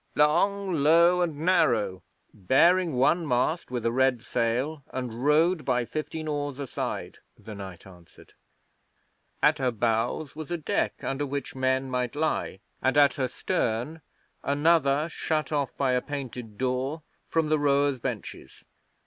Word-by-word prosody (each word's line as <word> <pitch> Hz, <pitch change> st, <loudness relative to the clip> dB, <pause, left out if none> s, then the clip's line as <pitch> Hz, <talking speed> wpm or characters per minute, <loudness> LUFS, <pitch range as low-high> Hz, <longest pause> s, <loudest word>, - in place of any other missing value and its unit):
'Long, 195 Hz, +6 st, +2 dB
low, 170 Hz, +4 st, +4 dB
and 165 Hz, -4 st, -1 dB
narrow, 115 Hz, -, +2 dB, 0.3 s
bearing 165 Hz, -, +3 dB
one 140 Hz, +7 st, +3 dB
mast 145 Hz, +6 st, 0 dB
with 125 Hz, -2 st, -4 dB
a 115 Hz, -, +2 dB
red 130 Hz, -1 st, +2 dB
sail, 125 Hz, +5 st, -1 dB
and 125 Hz, -2 st, -5 dB
rowed 155 Hz, +4 st, +3 dB
by 125 Hz, -2 st, 0 dB
fifteen 155 Hz, +3 st, -5 dB
oars 145 Hz, -2 st, -3 dB
a 140 Hz, -, -4 dB
side,' -, -, -5 dB, 0.2 s
the 110 Hz, -, -10 dB
knight 95 Hz, -4 st, -9 dB
answered. 90 Hz, -3 st, -17 dB, 1.1 s
'At 150 Hz, 0 st, +4 dB
her 130 Hz, -1 st, +1 dB
bows 120 Hz, +5 st, -1 dB
was 155 Hz, -1 st, -7 dB
a 175 Hz, -, -1 dB
deck 155 Hz, -, -2 dB
under 140 Hz, +2 st, -2 dB
which 140 Hz, +1 st, -4 dB
men 130 Hz, 0 st, 0 dB
might 125 Hz, +1 st, -2 dB
lie, 150 Hz, -10 st, -1 dB, 0.2 s
and 130 Hz, +2 st, +1 dB
at 145 Hz, -1 st, +6 dB
her 130 Hz, -2 st, -1 dB
stern 120 Hz, +6 st, -2 dB, 0.4 s
another 145 Hz, 0 st, +2 dB
shut 155 Hz, -1 st, -2 dB
off 145 Hz, -3 st, -1 dB
by 135 Hz, -2 st, +1 dB
a 125 Hz, 0 st, +2 dB
painted 125 Hz, -7 st, -7 dB
door 130 Hz, +5 st, -2 dB, 0.2 s
from 160 Hz, -2 st, 0 dB
the 155 Hz, -1 st, +2 dB
rowers' 140 Hz, -2 st, +2 dB
benches. -, -, -7 dB
140 Hz, 150 wpm, -27 LUFS, 125-155 Hz, 1.1 s, at